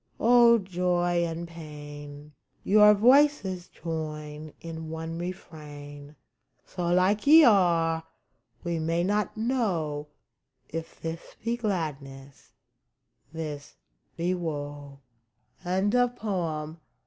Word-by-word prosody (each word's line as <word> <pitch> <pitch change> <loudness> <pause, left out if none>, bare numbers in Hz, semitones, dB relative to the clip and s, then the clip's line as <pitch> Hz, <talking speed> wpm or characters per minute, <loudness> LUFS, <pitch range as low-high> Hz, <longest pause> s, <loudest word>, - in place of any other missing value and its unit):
O 235 0 +6
joy 175 -3 0
and 165 +1 -5
Pain, 145 -2 -10 0.3
Your 210 +1 +6
voices 240 -6 +3
join 155 -2 -6
in 160 -1 -7
one 160 +1 -5
refrain! 150 -4 -9 0.5
So 175 -2 -4
like 185 +7 +2
ye 320 +2 +9
are, 170 - +3 0.6
we 170 -1 -2
may 165 +2 0
not 205 +3 -1
know 185 - -1 0.6
If 165 +1 -7
this 165 0 -7
be 230 +1 0
gladness, 140 - -5 0.8
this 155 -3 -6 0.4
be 175 +2 0
woe 145 -4 -5
165 Hz, 90 wpm, -27 LUFS, 150-190 Hz, 0.8 s, ye